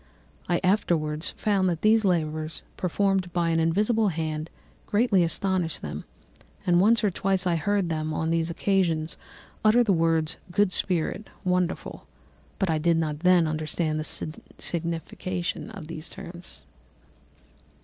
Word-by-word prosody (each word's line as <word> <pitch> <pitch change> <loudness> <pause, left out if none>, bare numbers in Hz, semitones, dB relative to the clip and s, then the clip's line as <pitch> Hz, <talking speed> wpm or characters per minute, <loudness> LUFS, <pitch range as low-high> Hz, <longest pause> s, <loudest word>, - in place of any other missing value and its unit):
I 175 - +2
afterwards 165 -5 +1
found 195 -3 +2
that 170 -2 -3
these 220 +1 +5
labours, 155 -4 -1
performed 190 0 0
by 170 -1 +1
an 165 - +2
invisible 210 +7 +2
hand, 160 -2 -2 0.4
greatly 210 -4 +3
astonished 180 0 -1
them; - - -5 0.6
and 175 0 +4
once 230 +3 +4
or 205 - +3
twice 190 +1 0
I 175 -2 +2
heard 195 +2 0
them, 155 -1 -2
on 160 +1 -1
these 165 0 +1
occasions, 170 -3 0 0.5
utter 220 +3 +5
the 210 -4 +2
words 165 -1 +1
good 205 +1 +2
spirit, 180 +3 +1 0.2
wonderful; 180 -1 -1 0.5
but 195 - 0
I 160 -2 +1
did 165 +1 +2
not 155 -2 -1
then 180 0 +5
understand 155 0 -1
the 155 0 -1 0.2
signification 170 +3 -3
of 200 -7 -9
these 155 0 -7
terms. 175 0 -10
175 Hz, 140 wpm, -26 LUFS, 160-195 Hz, 0.6 s, these